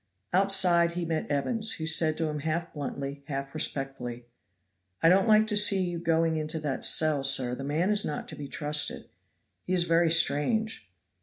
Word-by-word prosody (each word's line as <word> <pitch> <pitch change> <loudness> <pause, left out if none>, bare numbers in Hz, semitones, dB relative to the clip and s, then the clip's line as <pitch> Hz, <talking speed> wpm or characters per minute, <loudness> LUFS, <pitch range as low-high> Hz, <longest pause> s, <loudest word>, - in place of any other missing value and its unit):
Outside 180 -3 +3
he 175 0 -4
met 160 -1 -4
Evans, 220 - +1
who 160 - -5
said 160 -1 +3
to 165 - -1
him 150 -1 -4
half 160 +3 -4
bluntly 140 -1 -6
half 140 -2 -5
respectfully, 135 -5 -4 0.8
"I 165 - +6
don't 195 +5 +3
like 215 0 +4
to 215 -1 -2
see 200 -2 +4
you 175 -1 -4
going 165 -1 0
into 155 +1 -4
that 145 -3 -4
cell, 155 -3 +2
sir; 135 -2 +3
the 135 - -6
man 155 +8 -1
is 210 -1 +2
not 150 - -5
to - - -9
be 145 - -8
trusted. 150 +1 -3 0.6
He 185 - -2
is 180 -2 +2
very 170 0 +2
strange." 170 +8 0
160 Hz, 180 wpm, -27 LUFS, 145-180 Hz, 0.8 s, I